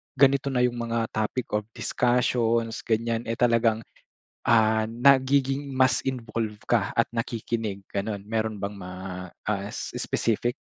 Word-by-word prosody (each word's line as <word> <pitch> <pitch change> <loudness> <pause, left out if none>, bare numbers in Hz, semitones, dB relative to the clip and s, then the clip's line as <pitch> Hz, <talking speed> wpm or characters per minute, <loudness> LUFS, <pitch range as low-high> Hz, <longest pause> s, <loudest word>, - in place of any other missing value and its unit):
ganito 140 0 +4
na 125 - +2
yung 120 -1 +1
mga 115 -1 -1
topic 110 +3 -2
of 105 0 0
discussions, 115 -2 +1
ganyan 115 +1 0
eh, 115 - -1
talagang, 115 -2 +3 0.7
ah, 110 -1 +4
nagiging 135 +3 +3
mas 130 0 +4
involve 115 -4 -2 0.2
ka 110 -5 +2
at 115 - +2
nakikinig, 115 -3 -3
gano'n? 100 0 -2
Meron 110 +1 -1
bang 100 +1 -3
ma 90 -1 -7 0.6
ah, 100 -1 -1
specific? 120 +2 -1
115 Hz, 130 wpm, -26 LUFS, 110-125 Hz, 0.7 s, ganito